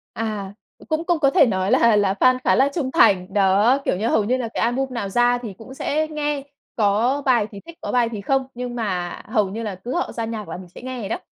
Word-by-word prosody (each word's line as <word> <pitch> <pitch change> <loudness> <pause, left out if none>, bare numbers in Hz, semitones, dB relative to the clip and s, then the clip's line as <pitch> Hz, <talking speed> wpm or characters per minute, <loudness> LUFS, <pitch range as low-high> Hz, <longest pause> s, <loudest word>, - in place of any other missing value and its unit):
À, 210 -3 -4 0.4
cũng 315 +1 -1
cũng 345 -2 +1
có 275 -3 +3
thể 275 - +5
nói 190 -3 0
là 230 -2 +5
là 200 -2 +2
fan 255 0 +5
khá - - +4
là 270 +2 +4
trung 275 -6 -1
thành. 195 - +3
Đó, 205 +6 +4
kiểu - - +1
như, 215 +5 -2
hầu 215 - +2
như 245 +5 +1
là 250 -3 -3
cái - - -1
album 245 +4 +1
nào 215 -4 -3
ra 240 +4 +2
thì 225 -5 -7
cũng 240 +4 -11
sẽ 310 +3 -1
nghe. 295 -2 -2 0.4
Có 225 +7 +2
bài 240 -5 +3
thì 200 - -10
thích, 335 0 -12
có - - -4
bài 245 -2 +3
thì 210 - -4
không, 265 +5 0
nhưng 245 0 -5
mà 185 -6 -2 0.2
hầu 215 -4 +1
như 220 +4 -5
là 210 -3 -4
cứ 210 +8 -6
họ - - -1
ra 230 - -3
nhạc 220 -3 -5
là 165 - -5
mình 180 -1 -11
sẽ 180 - -13
nghe 255 -1 -5
vậy 200 - -5
đó. - - -2
230 Hz, 265 wpm, -22 LUFS, 200-260 Hz, 0.4 s, thể